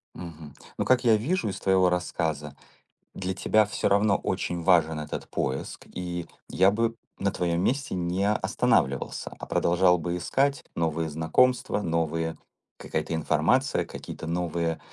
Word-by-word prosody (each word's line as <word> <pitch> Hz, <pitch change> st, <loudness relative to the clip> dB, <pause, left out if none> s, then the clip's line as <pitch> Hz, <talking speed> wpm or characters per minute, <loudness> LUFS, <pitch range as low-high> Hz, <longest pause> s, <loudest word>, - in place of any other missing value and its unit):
Мгм. 80 Hz, -4 st, -9 dB, 0.2 s
Ну, -, -, 0 dB
как 130 Hz, -1 st, +3 dB
я 115 Hz, -3 st, +5 dB
вижу 130 Hz, -, 0 dB
из -, -, -5 dB
твоего 95 Hz, -1 st, +3 dB
рассказа, 80 Hz, -5 st, -2 dB, 0.6 s
для 95 Hz, 0 st, -3 dB
тебя 110 Hz, +3 st, +3 dB
всё 105 Hz, -, -1 dB
равно 100 Hz, 0 st, +3 dB
очень 90 Hz, -2 st, -2 dB
важен 80 Hz, -3 st, +3 dB
этот 75 Hz, 0 st, -5 dB
поиск. 65 Hz, +1 st, -3 dB
И 90 Hz, -1 st, -4 dB, 0.2 s
я 95 Hz, +1 st, +4 dB
бы 115 Hz, +2 st, 0 dB, 0.2 s
на 100 Hz, 0 st, +1 dB
твоём 85 Hz, -1 st, 0 dB
месте 135 Hz, 0 st, 0 dB
не 90 Hz, +3 st, 0 dB
останавливался, 70 Hz, -9 st, 0 dB
а -, -, -6 dB
продолжал 90 Hz, +1 st, +3 dB
бы 85 Hz, +2 st, -3 dB
искать 135 Hz, +10 st, 0 dB
новые 80 Hz, -1 st, -1 dB
знакомства, 105 Hz, +10 st, +2 dB
новые 80 Hz, -1 st, -1 dB, 0.4 s
какая-то 85 Hz, -, -3 dB
информация, 80 Hz, -, +1 dB
какие-то 80 Hz, -, -8 dB
новые, 85 Hz, -1 st, -1 dB
90 Hz, 140 wpm, -27 LUFS, 80-100 Hz, 0.6 s, я